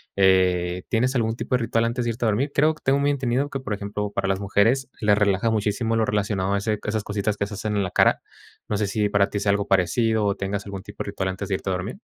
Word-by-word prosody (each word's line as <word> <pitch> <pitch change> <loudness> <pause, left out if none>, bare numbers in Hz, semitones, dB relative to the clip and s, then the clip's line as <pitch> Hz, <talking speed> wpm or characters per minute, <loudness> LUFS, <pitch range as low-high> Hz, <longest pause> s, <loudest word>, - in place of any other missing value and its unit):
Eh, 90 -2 +3
¿tienes 125 +3 +1
algún 115 -2 +1
tipo 125 - -1
de 125 - 0
ritual 115 0 +1
antes 120 +1 -1
de - - 0
irte 115 +1 -3
a - - +3
dormir? 120 +7 0
Creo 155 +3 +3
t 155 - -19
tengo 135 +1 +3
muy 145 - +2
entendido 135 0 0
que, 135 - -4
por 130 -5 -4
ejemplo, 100 0 -4
para 100 - -1
las 95 0 0
mujeres 105 +7 +2
les 105 -2 +3
relaja 100 +2 +2
muchísimo 110 +1 0
lo 110 -1 +2
relacionado 100 -2 0
a - - +2
ese 105 +2 -1
esas 105 0 -2
cositas 105 0 -1
que 100 - 0
se 105 - -9
hacen 105 +1 -3
en 100 - +1
la 95 - -4
cara. - - +3 0.5
No 105 - -1
sé 105 -1 0
si 105 +1 0
para 100 0 +2
ti 100 - -2
sea 100 0 +2
algo 100 0 0
parecido 105 +4 +2
o 100 -1 +1
tengas 100 +1 -3
algún 100 -1 -6
tipo 105 +1 -7
de - - -12
ritual 95 -1 -2
antes 95 +1 -4
de 95 - +1
irte 95 - -4
a - - +1
dormir. 95 - -5
105 Hz, 275 wpm, -24 LUFS, 100-115 Hz, 0.5 s, Eh